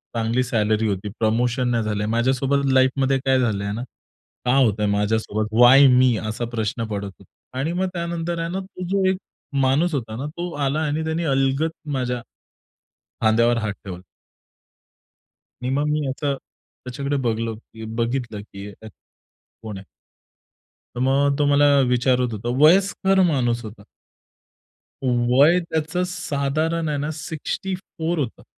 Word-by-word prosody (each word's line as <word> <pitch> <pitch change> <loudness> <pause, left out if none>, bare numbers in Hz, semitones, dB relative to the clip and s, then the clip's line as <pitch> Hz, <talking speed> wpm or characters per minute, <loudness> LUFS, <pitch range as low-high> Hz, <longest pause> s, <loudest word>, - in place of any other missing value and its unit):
चांगली 115 +2 +1
सॅलरी 110 -2 +1
होती, 100 +1 -2
प्रमोशन 120 +3 +1
नाही 115 -2 +1
झालं. 105 -1 -2
माझ्यासोबत 130 +4 +1
लाईफमध्ये 135 +1 +3
काय 130 -1 +3
झालंय 100 -4 -1
ना, 115 +3 -4 0.6
का 125 +2 +3
होतंय 110 -6 +3
माझ्यासोबत 110 0 0
वाय 135 +3 +8
मी? 125 -1 +5
असा 110 +2 -3
प्रश्न 110 +1 -2
पडत 100 -2 -4
होता. 100 - -19 0.3
आणि 160 +5 -1
मग 185 +1 0
त्यानंतर 170 0 -3
आहे 165 0 -2
ना 190 - -2
तो 185 -1 -8
जो 195 -1 +1
एक 190 - 0 0.5
माणूस 150 +6 +2
होता 115 -5 -3
ना 130 - -4
तो 175 0 -3
आला 145 +3 0
आणि 155 +2 -1
त्याने 160 +2 -1
अलगद 135 +2 +1 0.2
माझ्या 125 -3 -2 1.0
खांद्यावर 115 +2 +3
हात 105 -3 -2
ठेवला. 90 -2 -7 1.6
आणि 125 - -2
मग 145 +2 +1
मी 150 -1 0
याचा 140 +1 -1
त्याच्याकडे 140 +3 -7
बघलो 115 -1 -1
की 110 -1 -12
बघितलं 115 -2 -2
की 100 -1 -10
अ, 110 - -9 0.7
कोण 110 -3 -7
आहे? 95 - -11 1.1
तर - - -4
मग 140 +1 +2
तो 145 - +2
मला 145 0 +4 0.2
विचारत 125 -1 +2
होता, 110 +3 -4
वयस्कर 190 +3 +4
माणूस 120 -3 0
होता. 105 -1 -10 1.2
वय 130 +7 +4
त्याचं 160 +3 -1
साधारण 155 0 -1
आहे 145 - -1
ना 145 +2 -2
64 165 +2 -4
होतं. 130 -6 -4
130 Hz, 145 wpm, -22 LUFS, 115-150 Hz, 1.6 s, वाय